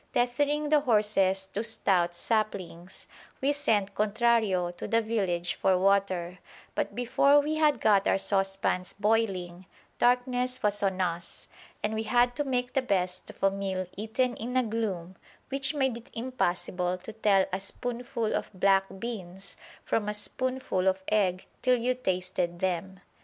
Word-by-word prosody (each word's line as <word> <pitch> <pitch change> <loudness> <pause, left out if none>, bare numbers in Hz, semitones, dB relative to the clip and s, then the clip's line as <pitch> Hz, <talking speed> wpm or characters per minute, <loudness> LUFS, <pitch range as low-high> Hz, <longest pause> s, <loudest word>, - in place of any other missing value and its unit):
Tethering 290 +5 +1
the 305 0 +5
horses 210 -6 +2
to 200 +3 -4
stout 185 -6 +1
saplings, 190 -3 -3 0.3
we 280 +2 +2
sent 215 -9 +1
Contrario 215 -4 +2
to 175 - -7
the 230 - +3
village 195 -6 -1
for 190 -1 +2
water; 185 -2 +1 0.3
but - - -2
before 265 +4 +4
we 305 +2 -1
had 300 -5 +3
got 205 -3 +3
our - - +3
saucepans 195 -2 0
boiling, 195 -4 -1 0.3
darkness 250 +1 +1
was 205 0 +2
on 190 -2 0
us, 170 -1 -3 0.4
and 210 - 0
we 220 - -1
had 245 +2 +2
to 290 - 0
make 250 -2 -1
the 270 - +2
best 185 -6 -1
of - - -12
a 195 - +5
meal 195 -1 -3
eaten 225 +4 -1
in 250 +3 -3
a 255 - +4
gloom 195 -6 -3 0.3
which 275 +2 0
made 265 -4 +1
it 235 +3 -11
impossible 180 -6 -1
to 185 +4 -10
tell 200 -3 +3
a 185 - 0
spoonful 240 +3 -3
of - - -2
black 195 +1 +4
beans 195 -4 -6 0.3
from 210 -2 0
a 210 - -1
spoonful 255 -3 -1
of 190 0 +1
egg 190 -4 +1 0.2
till 255 -1 +3
you 245 +2 +1
tasted 180 -6 -2
them. 190 +1 -2
210 Hz, 155 wpm, -28 LUFS, 185-245 Hz, 0.4 s, the